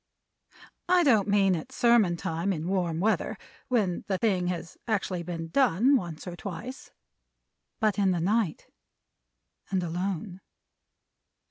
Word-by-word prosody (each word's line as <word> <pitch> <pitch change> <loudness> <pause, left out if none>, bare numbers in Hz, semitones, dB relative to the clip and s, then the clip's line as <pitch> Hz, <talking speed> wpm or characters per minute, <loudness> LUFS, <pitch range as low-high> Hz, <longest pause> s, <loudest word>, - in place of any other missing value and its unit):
I 360 -1 +5
don't 225 - +4
mean 195 -2 +3
at 160 - -6
sermon 230 -8 +3
time 165 +4 -2
in 165 -2 -3
warm 175 -4 0
weather 215 +5 0 0.3
(when 210 -9 0
the 190 - 0
thing 185 -3 +1
has 175 -1 -4
actually 195 -5 -1
been 165 -1 -5
done, 255 +4 +4
once 170 - -3
or 180 -2 -6
twice), 210 +8 -7 0.9
but 215 -4 +1
in 195 -1 +3
the 180 -2 +1
night, 195 -1 0 1.0
and 190 -2 0
alone. 180 +2 -3
190 Hz, 130 wpm, -28 LUFS, 175-215 Hz, 1.0 s, I